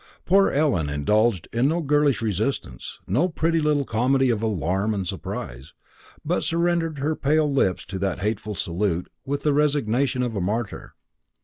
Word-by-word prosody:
Poor 195 +2 +4
Ellen 135 - +1
indulged 100 +7 +1
in 120 +4 +2
no 165 +4 +1
girlish 145 -4 +2
resistance, 105 - -3
no 145 - +1
pretty 165 0 +1
little 150 -2 +2
comedy 130 +2 +2
of 110 -2 -1
alarm 100 0 0
and 95 -2 -2
surprise, 65 +1 -6 0.5
but - - 0
surrendered 170 -2 0
her 150 +3 -1
pale 150 0 +1
lips 95 -9 +1
to 95 +1 -6
the 95 -1 -1
hateful 105 +1 -3
salute 90 0 -2 0.2
with 140 +1 -2
the 150 - +2
resignation 140 -3 +1
of 120 -3 -3
a 100 - -1
martyr. 105 +4 -3
120 Hz, 155 wpm, -24 LUFS, 100-150 Hz, 0.5 s, Poor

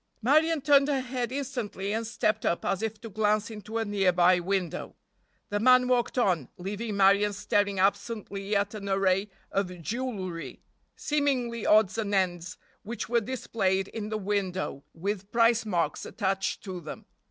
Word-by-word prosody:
Marion 310 +5 +3
turned 280 0 +5
her 280 -2 +1
head 250 -1 -3
instantly 245 -7 -3
and 225 0 -2
stepped 215 -1 0
up 170 - 0
as 195 - 0
if 220 -1 -3
to 230 - -7
glance 215 0 0
into 215 +1 -6
a 225 - 0
nearby 185 -3 +3
window. 180 -1 -2 0.5
The 205 - -1
man 255 +2 +5
walked 250 0 +1
on, 180 - +1
leaving 205 +3 -4
Marion 200 +1 +4
staring 200 0 0
absently 200 +1 -1
at 200 +1 +1
an 200 -2 -6
array 195 +1 +2 0.2
of 180 -2 -2
jewelry, 200 -7 -4 0.3
seemingly 260 -6 -1
odds 215 0 +4
and 205 -2 -1
ends, 180 -2 -1 0.2
which 225 0 -5
were 235 0 +3
displayed 195 -5 -1
in 215 -2 -5
the 215 - -2
window 190 -7 -2
with 195 +3 -4
price 230 -1 +3
marks 170 -6 -1
attached 195 -3 -2
to 185 -3 -6
them. 155 - -8
205 Hz, 155 wpm, -28 LUFS, 195-230 Hz, 0.5 s, turned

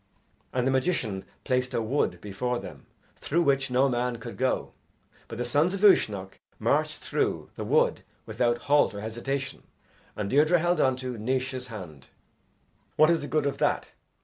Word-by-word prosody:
And 125 -1 0
the 135 - +2
magician 130 - 0 0.2
placed 125 -1 0
a - - +1
wood 110 -7 0
before 120 +5 -2
them - - -10 0.3
through 170 +4 0
which 135 -2 +2
no 130 +2 +3
man 125 -1 -1
could 115 0 -8
go, 130 0 -1 0.5
but 115 - -7
the 120 - -2
sons 150 +10 +2
of 195 - -6
Uisnech 100 - +3 0.2
marched - - 0
through - - -1
the - - -5
wood - - +2 0.2
without 120 +2 0
halt 145 -6 +3
or 100 - -5
hesitation, 135 +5 -4 0.5
and 105 - -3
Deirdre 150 - +4
held 175 0 +1
on 130 -1 +3
to 125 -2 -5
Naois's 130 +2 -2
hand. 90 - -9 0.9
"What 155 +2 +6
is 165 -2 +2
the 145 - -5
good 155 -1 0
of 140 - -2
that? - - +1
125 Hz, 170 wpm, -27 LUFS, 115-140 Hz, 0.9 s, What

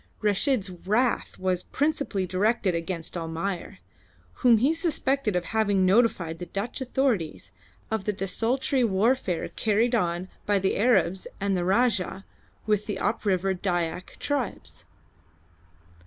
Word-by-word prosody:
Reshid's 210 0 +1
wrath 215 +8 0
was 185 -1 0
principally 285 -10 -1
directed 190 +1 +1
against 165 0 -3
Almayer, 170 +3 -4 0.6
whom 240 -3 +6
he 265 +8 +3
suspected 275 - 0
of 180 -1 0
having 205 -4 +2
notified 185 -5 +2
the 175 - -6
Dutch 205 +9 -4
authorities 240 - -1 0.4
of 220 -3 -1
the 210 - +1
desultory 235 +8 0
warfare 210 -2 +1
carried 225 +3 +1
on 175 -4 0 0.2
by 205 -1 +3
the 190 0 +1
Arabs 190 -5 +2
and 200 0 0
the 180 - 0
Rajah 195 -1 +1 0.4
with 210 -1 +1
the 205 -3 -2
up 225 +2 -1
river 190 -1 +2
Dyak 180 -2 -2
tribes. 280 -6 -3
200 Hz, 125 wpm, -26 LUFS, 185-235 Hz, 0.6 s, whom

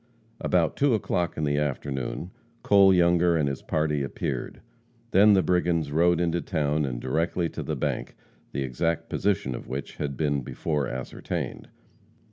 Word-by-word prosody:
About 85 -3 +1
2 140 -4 +3
o'clock 90 -4 -1
in 80 - -1
the 70 0 +1
afternoon, 70 +3 -3 0.3
Cole 100 -1 +6
Younger 85 -1 +4
and 75 -3 +1
his 70 -1 -3
party 75 -2 0
appeared, 70 - -4 0.5
then 105 +2 +6
the 95 -2 +4
brigands 85 -4 +1
rode 85 +2 +3
into 85 0 0
town 75 -4 0
and - - -3
directly 80 +6 0
to - - -6
the - - -3
bank, - - -3 0.4
the 70 - -2
exact 75 +6 -1
position 95 -10 0
of - - -7
which 70 +1 -5
had 70 -2 -3
been 70 -3 0
before 75 +3 -2
ascertained. 65 0 -5
80 Hz, 155 wpm, -26 LUFS, 70-90 Hz, 0.5 s, Cole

